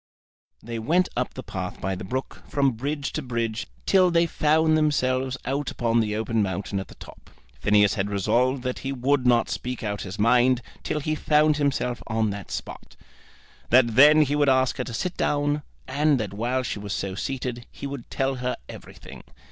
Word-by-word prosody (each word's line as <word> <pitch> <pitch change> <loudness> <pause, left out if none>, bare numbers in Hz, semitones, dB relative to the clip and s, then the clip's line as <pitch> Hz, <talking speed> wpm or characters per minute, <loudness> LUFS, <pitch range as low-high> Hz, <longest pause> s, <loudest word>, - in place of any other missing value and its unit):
They 115 0 -5
went 175 +11 +2
up 125 +1 -2
the 130 - -6
path 95 -4 -5
by 95 0 -2
the 95 - -6
brook, 130 +8 -5
from 140 -2 +2
bridge 140 +5 -3
to 155 - -2
bridge, 115 -4 -3 0.2
till 185 -2 +5
they 170 0 +3
found 155 0 +2
themselves 130 -4 +1
out 140 +1 -1
upon 115 -1 +1
the 105 -2 0
open 110 0 0
mountain 100 0 -2
at 95 - -6
the - - -14
top. - - -14 0.3
Phineas 105 -1 +4
had 100 -1 -1
resolved 125 +6 +1
that 125 -1 -3
he 135 - -4
would 130 0 +1
not 120 -1 +4
speak 125 -1 -4
out 105 -2 -3
his 95 +1 -6
mind 120 +3 +3 0.2
till 150 - -2
he 155 +2 -1
found 150 0 +3
himself 140 -4 -1
on 110 -2 0
that 100 -1 -7
spot; - - -7 0.7
that 120 -2 +5
then 150 +4 +8
he 145 0 -1
would 145 -1 +3
ask 130 -1 +2
her 125 - -1
to 120 - -7
sit 180 +8 -2
down, 145 0 0 0.3
and 145 +1 +2
that 105 -3 -4
while 120 +5 -1
she 110 - -4
was 100 -1 -5
so 95 -1 -3
seated 125 +2 -4
he - - -9
would 140 -3 -6
tell 135 0 -1
her 125 0 -2
everything. - - -11
125 Hz, 195 wpm, -25 LUFS, 110-145 Hz, 0.7 s, then